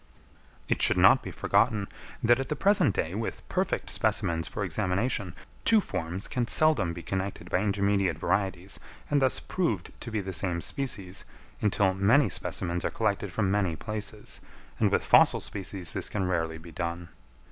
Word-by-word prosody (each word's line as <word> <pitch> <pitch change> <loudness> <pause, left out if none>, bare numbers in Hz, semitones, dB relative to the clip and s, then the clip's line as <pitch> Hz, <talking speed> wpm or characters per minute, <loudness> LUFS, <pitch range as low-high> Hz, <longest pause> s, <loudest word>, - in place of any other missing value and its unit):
It - - 0
should - - +5
not - - +6
be - - -7
forgotten, 105 -5 +1 0.4
that 120 +2 +5
at 135 - -3
the 150 - 0
present 190 - +3
day, 80 - -1
with 110 +3 -4
perfect - - -1
specimens 80 -1 0
for 105 - -4
examination, 95 +1 -1 0.3
two 225 - +6
forms 90 - -3
can 120 -2 -1
seldom 155 - +4
be 85 0 -7
connected 95 0 -4
by 90 - +3
intermediate 100 -4 +1
varieties, 95 +1 -1 0.3
and 145 -1 +3
thus 130 -1 +3
proved 115 - -2
to 120 - -7
be 110 -2 -2
the 95 -1 -5
same 90 -1 0
species, 100 -5 -2 0.4
until 100 -2 +2
many 105 +7 +4
specimens 85 -1 -2
are - - 0
collected - - -1
from 100 -4 0
many 100 -5 +1
places; 105 +2 -5 0.4
and - - +3
with - - +1
fossil - - +6
species 95 -3 -4
this - - -1
can 95 -3 -1
rarely 80 -3 -1
be 80 +1 -12
done. 85 +1 -4
100 Hz, 170 wpm, -28 LUFS, 90-110 Hz, 0.4 s, not